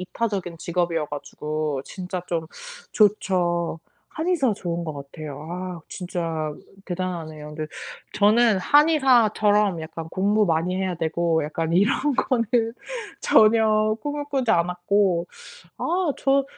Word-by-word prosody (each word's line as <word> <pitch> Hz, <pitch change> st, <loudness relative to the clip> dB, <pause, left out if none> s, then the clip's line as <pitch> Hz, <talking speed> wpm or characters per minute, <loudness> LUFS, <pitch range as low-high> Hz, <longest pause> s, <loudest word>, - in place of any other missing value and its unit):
이타적인 185 Hz, -3 st, -3 dB
직업이어 170 Hz, -3 st, -1 dB
가지고 145 Hz, 0 st, -4 dB
진짜 180 Hz, -1 st, -6 dB
좀 165 Hz, -2 st, -2 dB, 0.5 s
좋죠. 175 Hz, -5 st, +1 dB, 0.3 s
한의사 315 Hz, -8 st, +1 dB
좋은 175 Hz, -4 st, -3 dB
것 155 Hz, -2 st, -5 dB
같아요. 145 Hz, +1 st, -8 dB
아 180 Hz, -1 st, -5 dB
진짜 165 Hz, -4 st, -3 dB, 0.3 s
대단하네요. 165 Hz, -4 st, -5 dB
근데 155 Hz, 0 st, -4 dB, 0.5 s
저는 215 Hz, 0 st, +4 dB
한의사처럼 215 Hz, -, +4 dB
약간 160 Hz, 0 st, -7 dB
공부 205 Hz, +3 st, +2 dB
많이 170 Hz, +1 st, 0 dB
해야 190 Hz, -2 st, -1 dB
되고 165 Hz, -1 st, 0 dB
약간 160 Hz, +2 st, -2 dB
이런 240 Hz, +9 st, +2 dB
거는 240 Hz, -3 st, +1 dB, 0.8 s
전혀 215 Hz, -1 st, +4 dB
꿈을 290 Hz, 0 st, -3 dB
꾸지 270 Hz, -5 st, -1 dB
않았고 180 Hz, 0 st, +2 dB, 0.5 s
아 345 Hz, -3 st, 0 dB
저 275 Hz, 0 st, +3 dB
180 Hz, 250 characters per minute, -24 LUFS, 165-215 Hz, 0.8 s, 저는